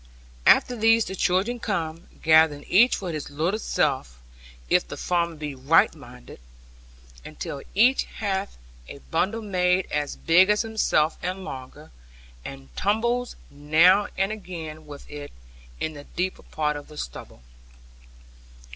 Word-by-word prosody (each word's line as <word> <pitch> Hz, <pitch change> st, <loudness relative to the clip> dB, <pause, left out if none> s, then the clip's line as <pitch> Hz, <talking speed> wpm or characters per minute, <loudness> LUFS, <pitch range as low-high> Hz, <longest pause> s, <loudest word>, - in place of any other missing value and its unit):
After 250 Hz, -, +5 dB
these 225 Hz, 0 st, +4 dB
the 190 Hz, -, -6 dB
children 195 Hz, +7 st, +1 dB
come, 165 Hz, -7 st, -3 dB, 0.2 s
gathering 155 Hz, -2 st, +5 dB
each 235 Hz, +7 st, +5 dB
for 185 Hz, -3 st, -5 dB
his 155 Hz, -2 st, -5 dB
little 165 Hz, +9 st, -1 dB
self, 130 Hz, -, -1 dB, 0.5 s
if -, -, +2 dB
the -, -, -7 dB
farmer 170 Hz, -2 st, 0 dB
be 150 Hz, -2 st, -5 dB
right 135 Hz, +5 st, +3 dB
minded; 125 Hz, -5 st, -13 dB, 0.8 s
until 140 Hz, -, -7 dB
each 245 Hz, +6 st, +4 dB
hath 200 Hz, -2 st, -4 dB, 0.3 s
a -, -, -8 dB
bundle 205 Hz, +7 st, 0 dB
made 180 Hz, -2 st, +1 dB
as 145 Hz, -1 st, -2 dB
big 180 Hz, +4 st, +4 dB
as 210 Hz, +2 st, +3 dB
himself 215 Hz, -8 st, +1 dB
and 185 Hz, +2 st, -4 dB
longer, 130 Hz, -8 st, -9 dB, 0.5 s
and 135 Hz, -, -10 dB
tumbles 235 Hz, +5 st, 0 dB, 0.2 s
now 160 Hz, +8 st, +4 dB
and 195 Hz, +2 st, +1 dB
again 160 Hz, -7 st, -8 dB
with 145 Hz, -1 st, -11 dB
it, 145 Hz, -1 st, -8 dB, 0.5 s
in 155 Hz, -, -3 dB
the 145 Hz, -1 st, -11 dB
deeper 185 Hz, +2 st, -3 dB
part 150 Hz, -1 st, -2 dB
of 145 Hz, 0 st, -8 dB
the 150 Hz, -, -13 dB
stubble. 60 Hz, -, -8 dB
170 Hz, 140 wpm, -25 LUFS, 150-200 Hz, 0.8 s, After